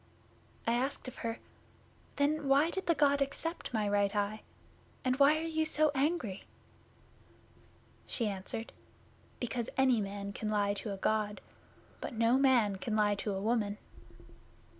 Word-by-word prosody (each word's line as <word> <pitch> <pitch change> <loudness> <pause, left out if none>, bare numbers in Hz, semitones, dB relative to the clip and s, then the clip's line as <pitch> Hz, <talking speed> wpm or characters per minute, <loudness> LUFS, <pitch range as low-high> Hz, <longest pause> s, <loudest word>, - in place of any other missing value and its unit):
I 230 - +2
asked 260 +3 -1
of 255 - -8
her, 230 0 -3 0.8
"Then 290 +1 +1
why 285 +5 +4
did 380 - -4
the 335 - +4
God 285 -1 +3
accept 330 +5 -3
my 215 -3 0
right 205 0 +1
eye, 205 +1 -1 0.6
and 255 0 +2
why 285 +2 +6
are 315 - -3
you 320 -1 0
so 310 -1 +3
angry?" 275 - -1 1.6
She 235 - 0
answered, 200 +3 -4 0.7
"Because 240 -1 -3
any 260 -4 +4
man 200 0 -5
can 215 - -3
lie 205 -1 +1
to 205 +1 -5
a 195 - -4
God, 210 +1 0 0.6
but - - -5
no 230 +3 +3
man 240 -8 +4
can 215 +3 -3
lie 210 -1 +3
to 205 0 -2
a - - -2
woman. 210 -2 0
230 Hz, 150 wpm, -32 LUFS, 205-280 Hz, 1.6 s, why